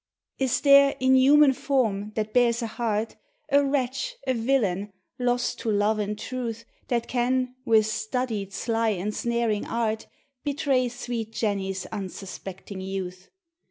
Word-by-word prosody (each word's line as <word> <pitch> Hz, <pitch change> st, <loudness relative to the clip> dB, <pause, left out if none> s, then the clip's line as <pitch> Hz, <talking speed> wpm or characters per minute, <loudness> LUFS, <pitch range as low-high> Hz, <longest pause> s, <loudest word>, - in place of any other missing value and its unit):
Is 265 Hz, -3 st, +1 dB
there, 280 Hz, -1 st, +6 dB
in 260 Hz, 0 st, +4 dB
human 275 Hz, +2 st, +6 dB
form, 220 Hz, -7 st, 0 dB
that 215 Hz, -1 st, -2 dB
bears 240 Hz, -1 st, +3 dB
a -, -, 0 dB
heart, 225 Hz, -1 st, -2 dB, 0.3 s
A 285 Hz, +1 st, +5 dB
wretch, 265 Hz, -2 st, -1 dB
a 260 Hz, -, +1 dB
villain, 225 Hz, -5 st, 0 dB, 0.3 s
lost 245 Hz, 0 st, 0 dB
to 230 Hz, -, -2 dB
love 210 Hz, +1 st, +2 dB
and 210 Hz, 0 st, -2 dB
truth, 230 Hz, -2 st, -5 dB, 0.2 s
That 235 Hz, -2 st, 0 dB
can, 255 Hz, +1 st, 0 dB
with 220 Hz, -3 st, +5 dB
studied, 220 Hz, -2 st, -2 dB
sly, 225 Hz, +3 st, 0 dB
ensnaring 215 Hz, +3 st, -1 dB
art, 220 Hz, -2 st, -1 dB, 0.4 s
Betray 275 Hz, -3 st, +1 dB
sweet 235 Hz, -2 st, -5 dB
Jenny's 195 Hz, -4 st, -2 dB
unsuspecting 195 Hz, -1 st, -7 dB
youth? 185 Hz, -1 st, -5 dB
230 Hz, 130 wpm, -26 LUFS, 210-255 Hz, 0.4 s, there